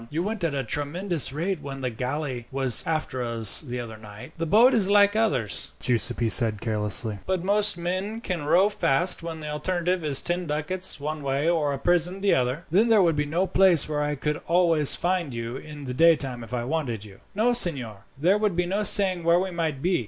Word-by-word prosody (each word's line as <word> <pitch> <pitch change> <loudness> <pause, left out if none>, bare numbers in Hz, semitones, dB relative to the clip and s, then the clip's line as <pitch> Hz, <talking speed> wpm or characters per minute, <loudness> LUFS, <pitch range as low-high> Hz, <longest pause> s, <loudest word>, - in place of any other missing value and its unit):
You 160 +3 -3
went 210 -1 -5
at 160 -4 -2
a 135 - -3
tremendous 150 - -1
rate 170 +4 -4
when 135 -1 -8
the 125 -1 -3
galley 125 +1 -5
was 130 -3 +6
after 155 -5 -3
us 115 -3 +6
the 125 -5 -7
other 115 -2 -9
night." 110 +5 -13
"The 165 - -3
boat 230 +9 +4
is 200 -4 +2
like 205 0 +3
others," 135 - -2
Giuseppi 120 -1 0
said 110 -2 +3
carelessly; 105 -1 -2
"but 185 -2 -2
most 205 0 +1
men 185 +6 -4
can 180 -8 -5
row 175 +7 +2
fast 175 -3 +2
when 165 -1 -8
the 150 - -7
alternative 175 +3 -3
is 145 -3 +2
ten 175 0 -2
ducats 155 +4 -1
one 150 +1 -6
way 140 +2 -2
or 160 -4 0
a 140 - -4
prison 175 +5 -1
the 200 - +1
other." 130 +6 -2
"Then 205 +7 +2
there 220 -4 +3
would 165 -3 +1
be 145 0 -2
no 170 +6 -1
place 185 -4 +3
where 150 -1 -3
I 150 0 -2
could 150 +2 -4
always 165 -4 +4
find 175 -7 -3
you 115 +2 -6
in 150 0 -11
the 125 -2 -6
daytime 135 -5 +1
if 115 - -13
I 125 -1 -3
wanted 125 -6 -4
you?" 100 -2 -16 0.2
"No, 230 +4 +1
signor; 130 - +1
there 180 +8 +1
would 210 -4 -1
be 180 0 -1
no 195 +4 -3
saying 190 -4 +3
where 170 +1 +3
we 190 0 -4
might 160 -5 -4
be. 180 +1 0
155 Hz, 215 wpm, -24 LUFS, 130-185 Hz, 0.2 s, was